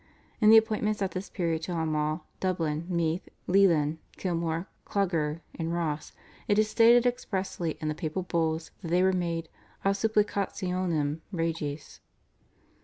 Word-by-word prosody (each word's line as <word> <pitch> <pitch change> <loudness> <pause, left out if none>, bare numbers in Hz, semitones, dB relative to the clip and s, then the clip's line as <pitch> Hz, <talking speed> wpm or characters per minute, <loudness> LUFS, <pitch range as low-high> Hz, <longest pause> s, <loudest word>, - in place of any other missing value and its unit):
In 215 - +6
the 225 - +10
appointments 215 -2 +2
at 190 - -1
this 185 +3 -5
period 165 -4 -1
to 175 +2 -4
Armagh, 155 -1 0 0.2
Dublin, 165 -3 -1
Meath, 170 -1 -1 0.2
Leighlin, 165 -5 +4 0.2
Kilmore, 170 -1 -1 0.2
Clogher, 165 -6 0
and 165 -1 -3
Ross 155 -3 -2 0.4
it 205 - +3
is 215 0 +4
stated 235 +2 +6
expressly 190 -8 -2
in 155 - -3
the 155 - 0
papal 155 +4 -3
Bulls 160 -2 -1
that 175 - -6
they 175 +2 +3
were 190 0 +4
made 170 -2 -1 0.4
/ad 195 - +5
supplicationem 185 -7 0
regis 165 -4 -3
170 Hz, 140 wpm, -28 LUFS, 160-195 Hz, 0.4 s, the